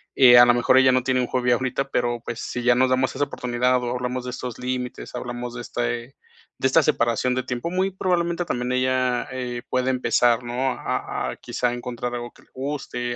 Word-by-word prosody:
eh, 125 -2 +8
a 120 - +10
la 120 - +5
mejor 120 +2 +3
ella 130 0 +6
no 130 -1 +2
tiene 130 0 +1
un 125 - 0
hobby 125 0 0
ahorita, 130 +2 0
pero, 120 -1 0
pues, 120 -1 -5
si 125 - -4
ya 120 0 +5
nos 130 +1 +3
damos 130 0 +1
esa 145 - +1
oportunidad 125 -1 0
o 120 - -2
hablamos 125 0 -3
de 125 - -5
estos 125 -2 -6
límites, 125 0 -4
hablamos 120 0 -5
de 120 - -5
este 120 +2 -3 0.4
de - - -2
esta 150 +5 +4
separación 125 -3 +1
de 130 - -1
tiempo, 125 +6 -3
muy 185 +2 0
probablemente 175 -2 0
también 125 -6 -2
ella, 130 0 +1
eh, 125 -2 -4
pueda 130 +1 +1
empezar, 120 -1 +2
¿no?, 125 +2 -1
a - - -3
a - - -7
quizá 125 -1 -2
encontrar 120 0 -4
algo 120 0 -6
que - - -21
le - - -29
guste, 130 -3 -4
125 Hz, 215 wpm, -23 LUFS, 120-130 Hz, 0.4 s, a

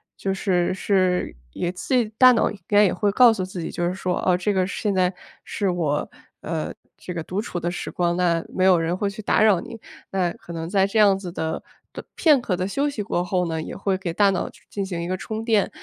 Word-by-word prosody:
就 195 - -2
是 185 -2 0
是， 185 -2 +1 0.2
也 175 - -3
自 185 +8 -4
己 240 -4 +3
大 255 +1 +8
脑 235 - +2
应 - - -8
该 205 0 +6
也 190 - +1
会 205 +3 +1
告 240 +2 +6
诉 195 -4 -3
自 185 -1 -6
己 160 - -4
就 175 - -2
是 175 - 0
说： 185 -1 -2
“哦， 180 -1 +3
这 195 +3 0
个 185 -1 +2
现 200 +1 -2
在 185 0 +2 0.3
是 200 -2 -2
我， 160 -5 -1 0.3
呃， 160 -1 -3 0.2
这 180 - -8
个 170 - -3
独 185 +5 -2
处 180 -5 -5
的 175 - -2
时 180 - -5
光， 175 -1 0
那 170 -2 +1
没 185 - -2
有 185 -2 +5
人 165 +2 0
会 200 +2 -1
去 210 +2 -8
打 210 - +2
扰 210 -5 +5
你。” 230 - -8 0.3
那 185 -3 0
可 170 - -11
能 165 0 -5
在 195 0 +3
这 200 - -3
样 200 -2 +5
子 180 -3 -7
的 160 -2 -3 0.3
不 - - -7
片 300 -6 +4
刻 195 -6 -1
的 180 - -2
休 275 +9 0
息 240 -7 -4
过 180 -3 -1
后 180 0 0
呢， 160 -1 -2
也 - - -7
会 195 -1 -1
给 180 -3 -4
大 200 +2 +4
脑 190 - -1
去 - - -20
进 200 -1 -3
行 175 -3 -4
一 170 - -4
个 185 - -1
充 220 +3 -5
电， 220 -3 +2
185 Hz, 275 characters per minute, -23 LUFS, 175-205 Hz, 0.3 s, 大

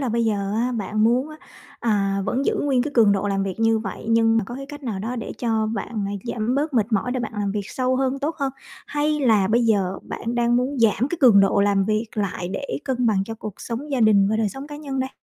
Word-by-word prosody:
là 265 - -1
bây 230 0 +1
giờ 200 -2 -1
á 245 +2 0
bạn 215 -1 0
muốn 250 +5 +2
á, 310 - -10 0.4
à, 200 -3 +1
vẫn 260 +3 -1
giữ - - +1
nguyên 270 -4 +2
cái 290 - -3
cường 220 -4 +5
độ 200 +1 0
làm 195 -1 0
việc 195 +2 -4
như 225 0 +3
vậy, 210 -1 -6
nhưng 225 0 +4
mà 220 - 0
có 240 +5 -8
cái 275 +1 -7
cách 290 0 -10
nào 225 -7 -3
đó 230 +5 -4
để 225 - -5
cho 225 -2 0
bạn, 215 -1 -3
à, 200 - -4
giảm 235 +1 -1
bớt 290 0 -1
mệt 225 0 +1
mỏi 230 +5 +1
để 255 - -2
bạn 230 - -4
làm 205 -1 -1
việc 205 -1 -4
sâu 255 0 0
hơn, 265 +1 0
tốt 300 +4 -2
hơn? 275 -2 -1 0.3
Hay 300 +1 0
là 215 -7 +3
bây 235 +2 +3
giờ 195 -4 +1
bạn 235 +1 -5
đang 240 0 +2
muốn 260 +3 -1
giảm 230 +3 +3
cái 345 - -3
cường 235 -7 +7
độ 195 0 +3
làm 200 -1 +3
việc 215 +2 0
lại 185 -4 -2
để 280 +8 -4
cân 250 -3 0
bằng 195 -3 +2
cho 225 - -6
cuộc 215 -2 -7
sống 255 +6 -5
gia 270 -3 0
đình 205 -3 +5
và 220 - +1
đời 220 -2 +1
sống 270 +6 -8
cá 295 0 -8
nhân 275 -3 -4
đây? 260 0 -2
230 Hz, 270 wpm, -23 LUFS, 205-260 Hz, 0.4 s, cường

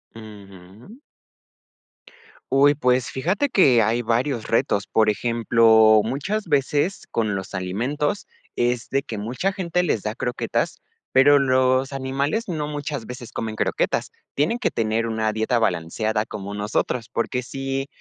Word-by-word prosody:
Ujú. 105 - -13 1.5
Uy, 140 +2 +5
pues, 125 -2 +1
fíjate 190 - -1
que 130 - +5
hay 115 +3 +1
varios 120 +1 -1
retos. 105 -3 +1
Por 110 -1 +3
ejemplo, 110 -1 +4
muchas 150 - -2
veces, 145 +4 0
con 110 -3 0
los 95 +1 -6
alimentos, 125 - -2 0.3
es 120 0 -1
de 135 - +1
que 115 -5 -7
mucha 125 - -2
gente 180 -2 -1
les 115 - -1
da 105 - -2
croquetas, 120 0 -2 0.4
pero, 145 +2 +7
los 130 0 +2
animales 140 - -2
no 155 -5 -3
muchas 145 -4 -5
veces 125 0 -9
comen 110 -1 -4
croquetas, - - -1 0.2
tienen 155 +12 +1
que - - -1
tener 115 0 0
una 110 -1 -1
dieta 110 +2 0
balanceada 110 +2 -1
como 100 -2 -7
nosotros, 110 +3 -2
porque, 125 +2 -2
si, 135 +1 -4
125 Hz, 135 wpm, -23 LUFS, 110-140 Hz, 1.5 s, pero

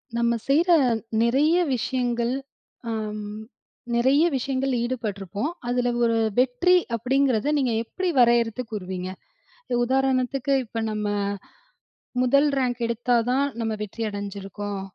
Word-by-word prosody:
நம்ம 235 0 +2
செய்யிற 330 +6 +3 0.5
நிறைய 275 +8 +3 0.2
விஷயங்கள் 245 -1 -1 0.6
ஆ - - -1 1.0
நிறைய 265 +6 +4
விஷயங்கள் 265 +1 -1
ஈடுபட்டிருப்போம், 215 - -3 0.2
அதில 245 0 +1
ஒரு 230 -1 +2 0.2
வெற்றி 260 +9 +3 0.2
அப்படிங்கிறதை 260 +1 +1
நீங்க 255 -5 +1
எப்படி 370 +10 -3
வரையறுத்து 235 0 +3
கூறுவீங்க? 185 -3 -4 0.7
உதாரணத்துக்கு, 265 +1 +1
இப்ப 225 0 -4
நம்ம 210 -1 -2 1.1
முதல் 280 +4 +4
ரேங்க் 250 -2 -1
எடுத்தா 240 +1 0 0.2
தான் 270 +2 +2 0.2
நம்ம 220 -1 -1
வெற்றி 210 +2 -5
அடைஞ்சிருக்கோம், 200 0 -5
245 Hz, 105 wpm, -24 LUFS, 220-265 Hz, 1.1 s, நிறைய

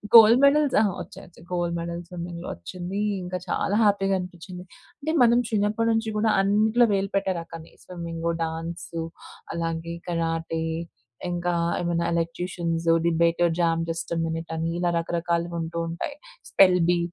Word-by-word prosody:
Gold 225 +2 +9
medals 285 0 +4
ఆ! - - +4 0.2
వచ్చాయి 195 - -10
వచ్చాయి. 170 0 -17
గోల్డ్ 175 -1 -1
మెడల్ 170 0 -4
స్విమ్మింగ్‌లో 175 0 -6
వచ్చింది. 180 - -6 0.2
ఇంకా 180 +1 -3
చాలా 200 - 0
హ్యాపీగా 195 -2 +3
అనిపించింది. 180 0 -8 0.4
అంటే 310 +3 -2
మనం 235 0 +5
చిన్నప్పటి 215 +1 +1
నుంచి 225 0 0
కూడా, 220 +1 +2
అన్నిట్లో 215 +4 +4
వేలు 195 0 0
పెట్టే 195 -1 +1
రకమే. 165 -1 -10
స్విమ్మింగ్, 170 -2 -5 0.2
డాన్స్ 165 +1 -5 0.7
అలాగే 165 0 -3
కరాటే, 165 -1 -1 0.7
ఇంకా 175 0 -1 0.3
ఏమైనా 170 -1 0
ఎలక్యూషియన్స్, 170 0 -2 0.2
డిబేట్, 170 +1 +2 0.2
జామ్ 165 -1 +2
జస్ట్ 165 +1 -4 0.2
మిట్ 165 0 -5
అని 165 +1 -1
ఇలా 175 -1 +1
రకరకాలుగా 170 0 -1
ఉంటూ 165 +1 -4
ఉంటాయి. 235 - -5 0.3
Spell 185 -2 +6
B. 175 - +2
175 Hz, 140 wpm, -25 LUFS, 165-195 Hz, 0.7 s, గోల్డ్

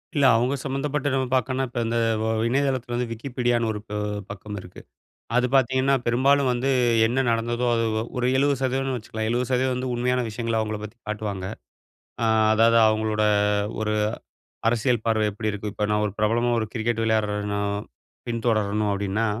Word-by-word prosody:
இல்ல. 140 -2 +3
அவங்க 125 +4 +1
சம்மந்தப்பட்ட 140 +1 -2
நம்ம 130 -1 0
பாக்கணும்னா, 130 +1 0
இப்ப 120 - -4
இந்த 115 +1 -1 0.3
ஒ - - 0 0.2
இணையதளத்துல 130 -1 0
வந்து 125 0 -1
Wikipediaன்னு 120 -1 -1
ஒரு 105 - -5 0.2
அ - - -1 0.3
பக்கம் 105 +1 -7
இருக்கு. 90 0 -12 0.5
அது 125 0 +4
பாத்தீங்கன்னா, 130 +1 +3
பெரும்பாலும் 130 +3 +3
வந்து 125 +3 -1 0.4
என்ன 130 +3 +1
நடந்ததோ 120 +1 0
அது 115 0 +1 0.3
ஒரு 125 - 0
70%னு 135 -1 +1
வச்சுக்கலாம் 110 -1 -4
70% 125 +2 +1
வந்து 125 0 -3
உண்மையான 125 +1 +1
விஷயங்கள 115 +1 -2
அவங்கள 110 -1 -3
பத்தி 105 +3 -9
காட்டுவாங்க. 105 -3 -3 0.8
அ - - +2 0.3
அதாவது 115 +1 +5
அவங்களோட 110 0 0 0.6
ஒரு 105 0 0 0.8
அரசியல் 120 0 +1
பார்வ 110 -1 +2
எப்படி 110 +2 -3
இருக்கு, 105 0 -5
இப்ப 105 - -3
நான் 105 0 +1
ஒரு 100 - -3
பிரபலமா 115 +3 +2
ஒரு 110 - -2
கிரிக்கெட் 115 0 -1
விளையாடுறன்னோ 105 -2 0 0.7
பின்தொடரணும் 110 -3 0
அப்டின்னா, 100 +3 -1
115 Hz, 150 wpm, -24 LUFS, 110-130 Hz, 0.8 s, அதாவது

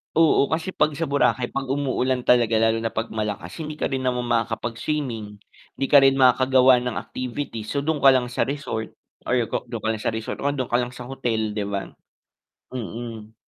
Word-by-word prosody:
Oo, 155 -3 +4
kasi 165 +3 -2
'pag 150 -3 +1
sa 165 - -2
Boracay 140 -4 +1
'pag 135 -1 -3
umuulan 130 -2 0
talaga 120 -2 +4
lalo 115 0 +3
na 115 - -1
'pag 115 +1 -4
malakas, 105 - -4
hindi 155 -1 -5
ka - - -2
rin 135 - 0
naman 125 -1 -1
makakapag-swimming, 115 0 -2 0.4
'di 135 - -1
ka 145 - +9
rin 135 0 +5
makakagawa 130 -1 +5
ng 125 -1 -3
activities, 125 -3 -5
so 140 -1 -2
dun 155 -1 0
ka 135 -1 +7
lang 125 -1 0
sa 115 - 0
resort 135 -6 -4 0.3
Or 125 - +2 0.2
kung - - -3
dun 115 -3 -5
ka 110 - 0
lang 110 - -3
sa 110 - -1
resort, 110 - -5
o 140 - -1
andun 135 -3 -1
ka 120 - +3
lang 120 0 -3
sa 125 - -8
hotel 120 -4 -2
'di 105 -1 -3
ba? 100 -1 -4 0.8
Mm. 115 -1 -7
125 Hz, 200 wpm, -23 LUFS, 115-135 Hz, 0.8 s, ka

